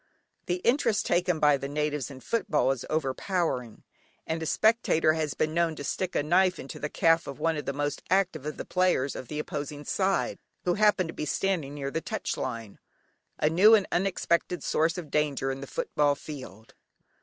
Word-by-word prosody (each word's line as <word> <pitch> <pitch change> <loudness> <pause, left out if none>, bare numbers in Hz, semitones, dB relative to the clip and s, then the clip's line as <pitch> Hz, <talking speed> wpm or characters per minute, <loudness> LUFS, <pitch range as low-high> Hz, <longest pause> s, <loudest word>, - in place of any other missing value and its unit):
The 180 - +1
interest 235 -5 +2
taken 175 -1 +1
by 150 -2 +5
the 140 0 -5
natives 150 -1 -2
in 130 -2 -10
football 150 - +1
is 135 -2 -3
overpowering, 155 - -1 0.4
and 160 0 -2
a 160 - -3
spectator 215 -8 +3
has 155 -3 -2
been 155 0 0
known 165 -1 +1
to 145 - -7
stick 185 +5 -3
a - - +2
knife 185 +4 +3
into 135 - -8
the 150 - -3
calf 165 +1 +3
of 140 - -7
one 165 -1 +1
of 150 - -4
the - - -1
most 145 +1 -2
active 185 -5 +1
of 150 - -5
the - - -5
players 180 -8 +1
on - - -6
the 150 - -6
opposing 145 -1 -5
side, 195 0 0 0.2
who 175 - +2
happened 205 -4 +3
to - - -5
be - - -4
standing 160 -4 -1
near 140 -1 -4
the 165 - -2
"touch 220 +3 -3
line." 115 -3 -5 0.6
A - - +2
new 190 +8 +7
and 205 -3 +2
unexpected 175 -2 0
source 165 +2 +1
of 165 -5 -7
danger 145 -3 0
in 135 0 -6
the 140 - -7
football 145 +1 +1
field. 130 -8 -10
155 Hz, 195 wpm, -28 LUFS, 140-180 Hz, 0.6 s, new